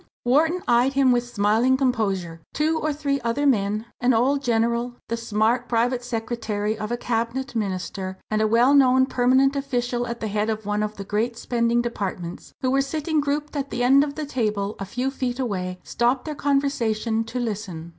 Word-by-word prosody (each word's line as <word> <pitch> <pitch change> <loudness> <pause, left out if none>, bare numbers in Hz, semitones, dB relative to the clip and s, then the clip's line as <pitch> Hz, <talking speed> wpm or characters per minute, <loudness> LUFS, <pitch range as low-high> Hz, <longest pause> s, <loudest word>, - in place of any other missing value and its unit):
_" - - -28 0.2
Wharton 315 +8 +2
eyed 245 +3 +3
him 270 -2 +4
with 245 0 +1
smiling 225 +5 +3
composure. 195 -10 -1
Two 315 +2 +1
or 310 - 0
three 280 -2 -1
other 235 +5 -1
men 215 -4 +1 0.2
an 245 0 +3
old 270 +5 +2
general, 235 0 0
the 230 - 0
smart 230 +2 0
private 245 +1 +1
secretary 225 -3 -2
of 215 +1 -5
a 240 - 0
cabinet 240 +3 -2
minister, 190 -3 -3
and 215 0 +1
a 215 - +3
well 235 +5 +4
known 260 -2 +5
permanent 260 +2 +3
official 245 -3 -1
at 235 0 -5
the 220 - -3
head 210 +1 -1
of 220 -1 -3
one 210 0 0
of 215 0 -3
the 200 - -5
great 220 +4 -1
spending 235 0 +1
departments 190 -7 -5
who 255 - +1
were 270 +1 +3
sitting 305 +2 -1
grouped 290 +1 -2
at 280 -1 -2
the 240 +1 -2
end 270 +3 +6
of 285 -1 -4
the 310 - -3
table 215 -6 -1
a 195 - -4
few 250 +7 -2
feet 255 -2 -3
away, 185 -7 -2
stopped 245 +2 0
their 310 - -3
conversation 240 -6 0
to 225 +3 -6
listen. 200 -8 -4
240 Hz, 195 wpm, -24 LUFS, 215-265 Hz, 0.2 s, end